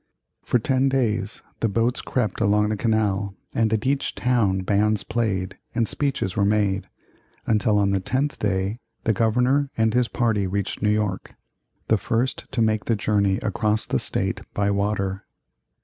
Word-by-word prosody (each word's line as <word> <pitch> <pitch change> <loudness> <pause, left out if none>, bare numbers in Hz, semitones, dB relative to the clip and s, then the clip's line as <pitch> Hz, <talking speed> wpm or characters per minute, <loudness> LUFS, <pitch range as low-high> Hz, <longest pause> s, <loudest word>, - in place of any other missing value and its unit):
For - - +1
ten 130 +3 +1
days 115 -5 -1 0.2
the 115 - +1
boats 115 +4 0
crept 125 -5 -2
along 105 0 +3
the 110 - 0
canal, 105 -3 0 0.2
and 110 -1 +1
at 110 +1 0
each 135 +1 0
town 110 -7 +1
bands 105 +2 +1
played, 100 -6 -2 0.2
and 115 -2 +1
speeches 135 -10 -1
were 100 - +2
made, 100 -1 +1 0.6
until 105 -1 +2
on 100 -1 +2
the 95 - +2
tenth 135 +9 -1
day 100 +2 -1 0.2
the 110 - +2
Governor 125 +6 +2
and 110 -1 +2
his 125 -1 +2
party 110 -5 0
reached 100 +1 -3
New 105 - +2
York 105 -3 -1 0.5
the 110 - +3
first 120 +5 -2
to 115 - +1
make 110 -2 +1
the 115 - +2
journey 100 -2 +1
across 105 +1 0
the - - 0
State - - -2
by 100 0 +1
water. 100 -1 -1
105 Hz, 165 wpm, -24 LUFS, 100-115 Hz, 0.6 s, along